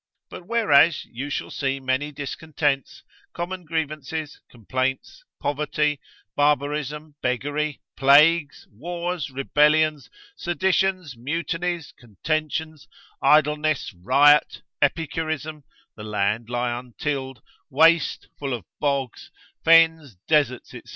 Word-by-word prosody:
But 175 - -10
whereas 165 -9 +4
you 130 +5 -7
shall - - -4
see 135 -1 -2
many 130 +3 -1
discontents, 145 -1 -3 0.3
common 180 +1 -5
grievances, 155 -1 -4
complaints, 130 - -3 0.2
poverty, 150 0 -1 0.4
barbarism, 150 +1 0
beggary, 145 +4 -2
plagues, 145 +2 +4
wars, 170 - -4
rebellions, 150 +3 +2 0.3
seditions, 185 - 0
mutinies, 165 +5 -3
contentions, 155 - -3 0.3
idleness, 150 -3 +2
riot, 140 +11 +4 0.2
epicurism, 155 -1 -2 0.3
the 105 - -9
land 105 +2 -1
lie 120 0 -1
untilled, 130 0 -5 0.3
waste, 160 +2 +3
full 135 -3 -2
of 110 -8 -10
bogs, 140 -4 -2 0.3
fens, 160 - +4
deserts, 145 -6 +1
&c. - - -9
150 Hz, 95 wpm, -23 LUFS, 135-160 Hz, 0.4 s, whereas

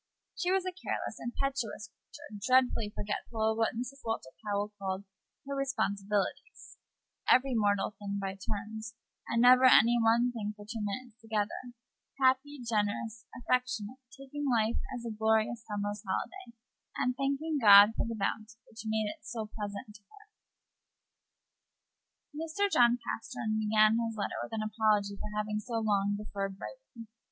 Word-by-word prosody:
She 360 +1 0
was 380 -1 +2
a 370 - -1
careless, 370 - -4
impetuous 240 -3 -3
creature, 290 -9 -12
dreadfully 255 -3 +3
forgetful 220 +2 -2
of 220 - -3
what 225 - +1
Mrs. 255 +4 -5
Walter 225 - -3
Powell 205 0 -2
called 190 0 -3 0.4
her 280 - -4
"responsibilities;" 210 - -2 0.5
every 260 +1 +5
mortal 205 -3 +2
thing 200 -1 -3
by 195 -1 -3
turns, 220 +3 -6 0.3
and 230 +1 +2
never 255 +1 +8
any 240 -1 +7
one 235 +2 +4
thing 210 -3 -4
for 205 - -11
two 225 +1 -5
minutes 220 +2 -5
together; 225 +3 -3 0.4
happy, 265 +2 +2
generous, 215 0 -1
affectionate; 250 -1 -1
taking 275 +3 -5
life 225 -2 +2
as 245 -2 -5
a 230 - -3
glorious 220 +1 +1
summer's 205 -1 -3
holiday, 235 - -5 0.4
and 250 0 +1
thanking 280 +3 -1
God 205 0 +9
for - - 0
the 230 - -3
bounty 215 +2 -3
which 220 - -10
made 220 0 +1
it 305 +9 -6
so 225 -3 -5
pleasant 205 0 -6
to 205 - -15
her. 415 - -20 2.0
Mr. 325 +6 -1
John 240 0 +5
Pastern 220 -1 -3
began 215 +1 +4
his 225 -1 -3
letter 205 - -2
with - - -6
an 220 -1 -1
apology 215 -2 +1
for 210 - -6
having 210 0 -1
so 230 +2 -6
long 205 -2 +1
deferred 195 -2 -4
writing. 390 - -10
225 Hz, 150 wpm, -31 LUFS, 210-250 Hz, 2.0 s, God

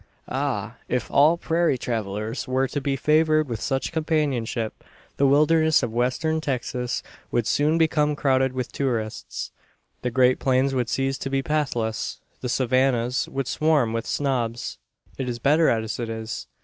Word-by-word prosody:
Ah! 125 -5 -2
if 125 -1 -2
all 155 +4 +5
prairie 170 -4 +1
travellers 110 0 -3
were 130 +1 +1
to 145 - -3
be 135 0 0
favoured 155 +2 +3
with 115 -3 -4
such 135 -1 -1
companionship, 145 -9 -1 0.3
the 140 - +4
wilderness 155 +3 +4
of 110 - -2
Western 130 +7 0
Texas 125 -3 -2 0.3
would 120 -2 0
soon 150 +6 +2
become 150 -2 +2
crowded 130 -2 +2
with 125 -1 -3
tourists; 115 -6 -3 0.5
the 125 - -1
great 125 +1 +3
plains 130 +1 +2
would 125 -2 0
cease 135 0 -1
to 135 - -3
be 135 0 0
"pathless," 125 -8 -1 0.2
the 125 - -4
savannas 130 -1 +1
would 135 -1 -2
swarm 150 -7 +2
with 115 0 -3
snobs. 120 -4 -2 0.4
It 130 -2 -2
is 120 - -3
better 150 +6 +4
as 110 -1 -1
it 115 -1 -3
is. 110 - -5
130 Hz, 155 wpm, -24 LUFS, 120-150 Hz, 0.5 s, all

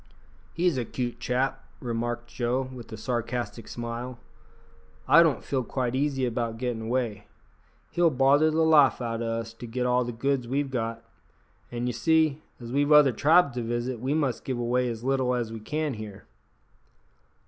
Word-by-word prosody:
"He's 170 -5 +2
a - - -1
cute 120 0 -4
chap 130 +3 -1 0.2
that," - - -13
remarked 120 0 -2
Joe, 125 +2 -1
with 120 -3 -10
a 110 - -6
sarcastic 120 -1 -3
smile; 120 +1 -5 0.9
"I 165 - +8
don't 160 -5 +2
feel 130 -2 -1
quite 125 0 -2
easy 135 -1 0
about 115 -1 -2
gettin' 120 -2 -2
away. 115 -3 -2 0.6
He'll 175 -1 +3
bother 140 +3 +4
the 160 +1 +2
life 150 -6 +5
out 115 -2 -3
o' 115 - -2
us 115 0 -3
to 120 +1 -9
get 125 +2 -2
all 125 0 +3
the 120 - -4
goods 125 +1 -1
we've 135 +2 -1
got, 115 -2 -3 0.7
and, 120 0 -3
ye - - 0
see, 155 +3 +2 0.2
as 120 -1 -8
we've 145 +3 +1
other 150 -3 +7
tribes 145 +4 +4
to 125 - -3
visit, 120 +1 -2
we 130 +5 -1
must 145 -6 0
give 130 -2 -3
away 125 +1 0
as 115 -1 -6
little 130 -1 +1
as 115 -2 -3
we 115 - -6
can 150 +6 -2
here." 105 -2 -9
125 Hz, 180 wpm, -27 LUFS, 115-135 Hz, 0.9 s, I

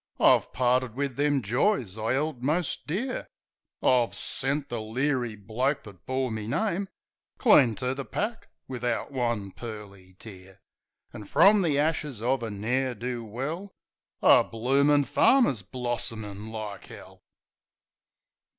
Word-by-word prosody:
I've - - +4
parted 125 -2 +1
wiv 140 -2 -2
them 145 -1 +1
joys 120 - +1
I 110 +3 -1
'eld 145 -2 -2
most 155 +5 -1
dear; 225 - -3 0.6
I've 125 -2 +3
sent 140 +2 -2
the 120 -4 -4
leery 120 +1 -1
bloke 115 +7 -1
that 100 -4 -14
bore 130 -1 -1
me 110 -1 -4
name 195 - -1 0.5
Clean 140 - +5
to 125 +2 -2
the 135 +1 -5
pack 220 - -4 0.2
wivout 125 0 -2
one 120 -7 -1
pearly 100 -5 -10
tear; 95 -3 -13 0.5
An' 105 - -8
frum 200 - +5
the 155 -6 +1
ashes 150 -4 0
of 125 +3 0
a 115 - -3
ne'er 125 +5 -1
do 120 +1 -4
well 150 - -5 0.5
A - - +7
bloomin' 140 +5 +2
farmer's 240 - +3
blossomin' 110 -4 -4
like 110 -3 -7
'ell. - - -13
125 Hz, 130 wpm, -27 LUFS, 110-145 Hz, 0.6 s, A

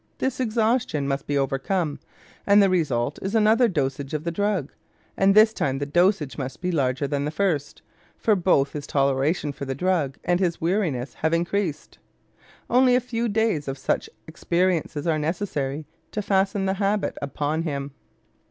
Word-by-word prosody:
This 265 -1 -2
exhaustion 225 - 0
must 135 0 -2
be 145 - 0
overcome, 140 +4 -1 0.5
and 200 0 +6
the 195 -2 +5
result 140 -7 0
is 195 +3 -3
another 225 +3 +4
dosage 140 -5 -2
of 150 - -3
the 170 - -2
drug; 200 -5 -1 0.4
and 195 +1 +3
this 215 +1 +7
time 135 -8 -1
the 145 - -2
dosage 160 - +1
must 130 -1 -5
be 180 0 -2
larger 135 -3 0
than 140 0 -1
the 150 - -1
first, 155 -4 -2 0.3
for 215 - +2
both 170 -7 +2
his 145 -1 -6
toleration 140 +3 +1
for 140 - -7
the 135 0 -3
drug 160 -4 0
and 175 0 +1
his 175 -3 0
weariness 165 -8 -1
have 160 +1 0
increased. 175 -1 -2 0.7
Only 250 0 +4
a - - +4
few 235 -1 -2
days 215 -9 0
of 135 0 -3
such - - -1 0.2
experiences 170 -2 -1
are 160 -2 +1
necessary 150 -3 -2 0.3
to 210 - -2
fasten 195 0 +1
the 190 - +1
habit 200 +1 0
upon 145 +3 -2
him. 140 -3 -3
165 Hz, 170 wpm, -24 LUFS, 140-200 Hz, 0.7 s, this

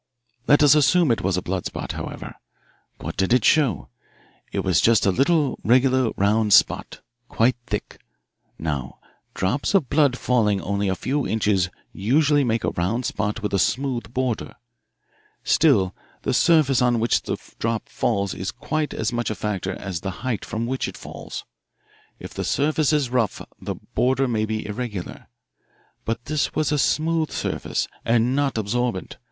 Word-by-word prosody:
"Let 145 +1 +5
us 145 -1 +7
assume 150 +1 +4
it 115 - +1
was 95 0 0
a 90 - -2
blood 95 0 -2
spot, - - -5
however. - - -6 0.6
What - - -6
did 95 +4 +2
it 125 -4 +3
show? 130 - +2 0.6
It - - -1
was 90 -3 +2
just 115 -1 +4
a 100 - +4
little 140 - +2
regular 130 +1 +3
round 105 +1 +2
spot, - - +3 0.3
quite 120 +2 +2
thick. - - -4 0.6
Now, 75 -5 -4 0.4
drops 125 - 0
of 160 -10 +2
blood 140 -4 +3
falling 110 -7 +1
only 100 +3 -1
a 95 - 0
few 140 +9 -1
inches 100 -3 +1 0.2
usually 145 +7 +2
make 115 -4 0
a - - 0
round 110 +8 -1
spot 105 -1 -2
with 105 - -2
a 100 - +2
smooth 120 - -1
border. 125 -3 -2 0.9
Still 95 -1 +3 0.3
the - - 0
surface 150 -6 +4
on 120 -1 +3
which 115 +1 +2
the - - -3 0.2
drop 115 -1 -2
falls 100 -4 -1
is 95 +1 -4
quite 155 -1 -3
as 110 +2 -2
much 120 -1 -1
a 110 - -2
factor 105 -3 -3
as 95 -3 -5
the 95 - -3 0.2
height 120 -5 -1
from 115 +1 -3
which 130 +2 -2
it - - -8
falls. - - -8 0.7
If - - -10
the - - -3
surface 155 +1 +1
is 145 -5 +1
rough 115 -6 0 0.2
the - - -4 0.2
border 130 +1 +2
may 110 -3 0
be 110 0 -3
irregular. 105 -3 -5 0.8
But 115 +1 -3
this 155 -1 -1
was 155 -1 +1
a 150 - +1
smooth 160 +2 +1
surface - - -2 0.2
and 120 +2 +2
not 140 -4 0
absorbent. 110 -1 -2
120 Hz, 165 wpm, -23 LUFS, 100-135 Hz, 0.9 s, us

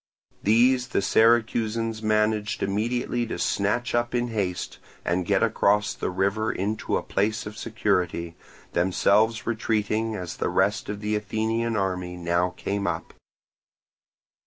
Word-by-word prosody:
These 125 +4 +4
the 130 - 0
Syracusans 115 0 +2
managed 105 0 +1
immediately 120 +4 -1
to - - -4
snatch 105 +5 0
up 120 +1 0
in 120 0 0
haste 95 -6 -3 0.3
and 90 +1 0
get 100 0 +3
across 105 -2 +2
the - - -3
river 100 +4 0
into 105 0 -1
a - - -4
place 110 +2 -1
of 105 +1 -7
security, 90 -7 -1 0.4
themselves 105 +5 +2
retreating 110 -1 0
as 90 -4 -6
the - - -1
rest - - +1
of 105 0 -4
the 105 0 -1
Athenian 110 +2 -1
army 90 -3 -2
now 85 +1 +1
came 100 0 -2
up. - - -3
105 Hz, 135 wpm, -25 LUFS, 100-115 Hz, 0.4 s, These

